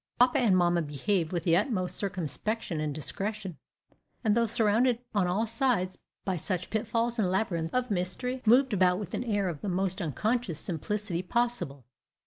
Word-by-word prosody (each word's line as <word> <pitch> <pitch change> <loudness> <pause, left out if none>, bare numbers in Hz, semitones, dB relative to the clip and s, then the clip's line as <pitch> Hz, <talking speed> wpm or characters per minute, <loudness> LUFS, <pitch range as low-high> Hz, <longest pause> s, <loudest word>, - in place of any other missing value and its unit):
Papa 245 0 +5
and 210 -7 +4
mamma 175 -1 +3
behaved 160 +4 -1
with 175 -3 -1
the 165 -2 +4
utmost 185 -3 0
circumspection 185 0 -2
and 155 -1 -1
discretion, 195 +5 -4 0.6
and 215 -2 +3
though 235 0 +3
surrounded 230 +2 +3 0.2
on 200 -4 +2
all 195 +6 +1
sides 225 -5 0 0.3
by 190 -2 0
such 180 +1 -3
pitfalls 230 +2 0
and 190 -4 +2
labyrinths 175 -4 0
of 250 -2 0
mystery, 225 +8 -2
moved 245 +2 +5
about 180 -2 +4
with 200 -3 -6
an - - -1
air 205 -5 0
of 160 -5 -4
the 205 - -2
most 190 +1 -1
unconscious 190 - -1
simplicity 185 +2 -2
possible. 185 - -1
195 Hz, 165 wpm, -29 LUFS, 175-230 Hz, 0.6 s, Papa